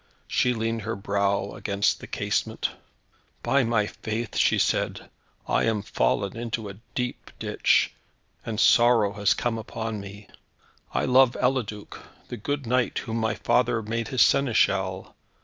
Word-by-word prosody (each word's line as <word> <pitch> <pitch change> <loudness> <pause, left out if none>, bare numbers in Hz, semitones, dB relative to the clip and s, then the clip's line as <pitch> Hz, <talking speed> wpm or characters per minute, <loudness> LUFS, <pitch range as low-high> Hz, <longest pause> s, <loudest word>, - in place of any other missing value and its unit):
She 125 -1 +1
leaned 115 0 -2
her 110 +2 -3
brow 100 0 0
against 100 0 0
the - - -10
casement. - - -2 0.7
"By 135 +3 +3
my 115 -3 +1
faith," 110 +2 -5
she - - +3
said, - - -1 0.4
"I - - +2
am 110 -3 0
fallen 100 0 0
into 115 -2 -4
a 100 - -10 0.2
deep 125 -1 -3
ditch, - - +2 0.5
and 110 -2 -4
sorrow 120 -4 +5
has 100 -3 +2
come 115 -2 -1
upon 110 -1 -5
me. 100 +1 -10 0.6
I - - 0
love 130 -1 +4
Eliduc, 120 -5 -2 0.3
the 120 - -5
good 140 +5 -3
knight, 125 +1 +1
whom 115 0 -3
my 110 -2 0
father 120 -2 +1
made 115 +2 -3
his 130 -3 +4
Seneschal. 140 -5 +1
115 Hz, 145 wpm, -25 LUFS, 105-120 Hz, 0.7 s, sorrow